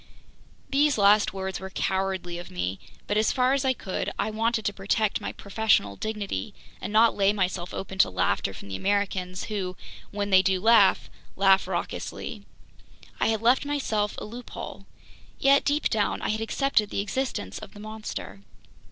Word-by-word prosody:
These 285 0 +3
last 205 +1 +5
words 190 -1 -4
were 190 +1 -7
cowardly 190 -2 -2
of 175 - -9
me; 90 +1 -3 0.3
but 205 - 0
as 215 - +3
far 255 0 +2
as 275 -1 +1
I 260 -1 +3
could, 190 -4 -3
I - - -1
wanted 225 0 0
to 205 - 0
protect 200 +2 0
my - - -3
professorial 200 - +1
dignity 210 - -4 0.3
and - - -4
not 220 +2 +5
lay 200 0 +4
myself 185 -3 -1
open 190 0 -6
to - - +6
laughter 95 +1 0
from 95 +1 -10
the 95 - -4
Americans, 190 - -1
who 190 -4 -4 0.3
when 205 0 -3
they 190 -1 +7
do 190 0 +1
laugh, 220 -1 +5 0.3
laugh 195 0 +4
raucously. - - -4 0.7
I - - +2
had 220 0 0
left 250 +4 +4
myself 245 -8 -1
a - - -5
loophole. 240 +4 -8 0.5
Yet 275 +1 +4
deep 290 +1 +2
down, 210 -2 0
I - - -1
had 215 +1 -1
accepted 225 -2 +1
the - - -1
existence 205 - -3
of - - -11
"the - - -10
monster." 215 - -7
205 Hz, 170 wpm, -26 LUFS, 190-225 Hz, 0.7 s, they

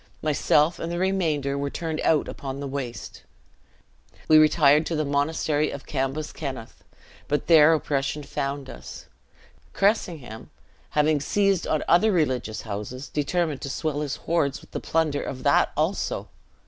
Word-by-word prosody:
Myself 150 +2 +2
and 165 - -4
the 175 - -2
remainder 160 -7 0
were 140 0 -2
turned 160 0 -4
out 155 -2 +2
upon 135 0 -6
the 140 - -4
waste. 130 -5 -6 1.1
We 155 0 +7
retired 155 -1 +5
to 165 - -2
the 155 0 0
Monastery 145 +1 0
of 140 - -7
Cambuskenneth; 135 -2 -4 0.4
but 145 - -1
there 160 -2 +7
oppression 145 -1 -2
found 140 -1 -4
us. - - -10 0.7
Cressingham, 170 - -1 0.5
having 150 0 +3
seized 195 +2 +1
on 155 - 0
other 215 +6 +4
religious 130 - -1
houses, 110 +5 -6
determined 150 0 -1
to 140 - -5
swell 150 +1 -2
his 145 -2 -2
hoards 140 -5 -1
with - - -18
the - - -3
plunder 155 -3 0
of 130 - -6
that - - +3
also. - - -1
150 Hz, 145 wpm, -25 LUFS, 140-160 Hz, 1.1 s, We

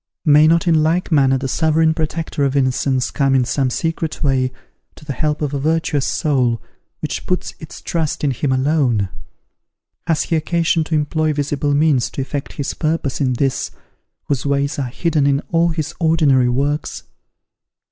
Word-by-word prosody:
May 150 0 +6
not 165 +2 +3
in 160 -2 +4
like 170 +4 0
manner 135 -3 +4
the 135 +1 -3
Sovereign 160 +2 +2
Protector 160 -2 -2
of 140 0 0
innocence 130 -1 +1
come 135 -2 +1
in 130 -2 +3
some 135 +1 0
secret 160 +2 -3
way, 130 -2 +1 0.4
to - - -15
the 145 - -3
help 150 +3 -1
of 145 -1 -2
a 140 - -1
virtuous 155 -1 0
soul, 125 -7 +1 0.4
which - - -4
puts 180 - -2
its 155 - -10
trust 160 -3 -2
in 145 - +2
Him 130 +2 -1
alone? 130 -7 +1 1.0
Has 160 -2 +2
He 165 - -1
occasion 165 +1 +1
to 160 - -1
employ 155 +1 0
visible 145 0 -1
means 145 -5 +2
to - - -4
effect 140 +1 -5
His 140 - -3
purpose 155 -4 -2
in 130 -2 +2
this, 135 +1 -1 0.5
whose 140 -4 -2
ways 140 +1 0
are 135 - -1
hidden 150 +1 0
in 140 0 +2
all 170 0 +3
His 160 -2 -3
ordinary 150 -7 +3
works? 140 +4 -1
145 Hz, 170 wpm, -19 LUFS, 135-160 Hz, 1.0 s, May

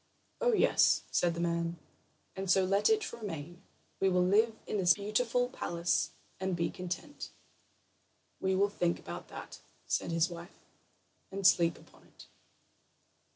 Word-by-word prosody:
"Oh, - - +3
yes," - - +4
said 175 -1 +2
the - - -5
man; 170 0 -1 0.6
"and 190 0 -4
so 190 +1 +4
let 200 - +3
it 435 -1 +1
remain. 175 -5 -7 0.4
We 195 - +3
will 180 -1 +3
live 220 +4 +3
in - - -2
this 180 -3 +5
beautiful 230 +4 0
palace 175 -8 -1 0.3
and 190 -1 -1
be 170 -1 -1
content." 180 +11 -6 1.1
"We 190 0 +1
will 200 +2 +3
think 175 -4 0
about 85 0 -8
that," - - -9 0.3
said - - -1
his 165 0 +2
wife, 170 0 -10 0.8
"and 195 0 -4
sleep 170 -3 +5
upon - - -20
it." - - -16
185 Hz, 145 wpm, -32 LUFS, 170-205 Hz, 1.1 s, this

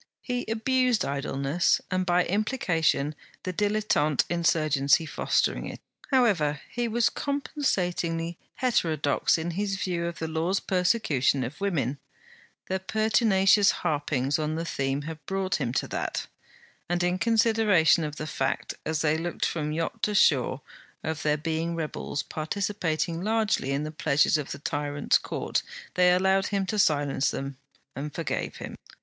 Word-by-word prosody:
He 245 -1 -2
abused 250 +1 +1
idleness, 140 +3 0
and 185 -1 0
by 175 0 +3
implication 175 - +1 0.3
the 185 - -3
dilettante 205 - +1
insurgency 155 -3 +2
fostering - - 0
it. - - -7 0.3
However, 190 - +2
he 240 -1 -1
was 230 0 +2
compensatingly 180 - -1 0.2
heterodox 165 - +1
in 165 +2 -3
his 195 +3 -1
view 175 -3 -2
of 170 - -5
the 160 - -3
Law's 165 +4 0
persecution 180 - +1
of 145 +7 -7
women; 145 - -1 0.7
their 190 0 -1
pertinacious 205 -1 +3
harpings 145 -2 0
on 155 0 -1
the 165 +1 -3
theme 135 -2 -2
had 160 0 -7
brought 190 -2 0
him 120 - -1
to - - 0
that; - - -3 0.6
and 175 0 +1
in 180 +1 +1
consideration 220 -8 +4
of 150 -1 -4
the 155 - -5
fact, 135 -3 -2
as 160 0 -1
they 155 0 +2
looked 175 +1 -2
from 150 -2 -2
yacht 165 +2 -3
to 210 - 0
shore, 135 -7 +3 0.4
of 160 0 -3
their 150 0 +1
being 165 +2 -2
rebels 155 -3 -3
participating 170 -1 -2
largely 215 -8 +1
in 140 +2 0
the 155 - -4
pleasures 150 0 +2
of 145 - -5
the - - -5
tyrant's 145 0 0
court, - - -2 0.3
they 180 0 +5
allowed 190 +2 +3
him 200 -1 -1
to 210 +2 -2
silence 145 -5 +2
them, 135 -1 -5 0.4
and 145 +2 -5
forgave - - -3
him. - - -7
170 Hz, 145 wpm, -27 LUFS, 150-200 Hz, 0.7 s, they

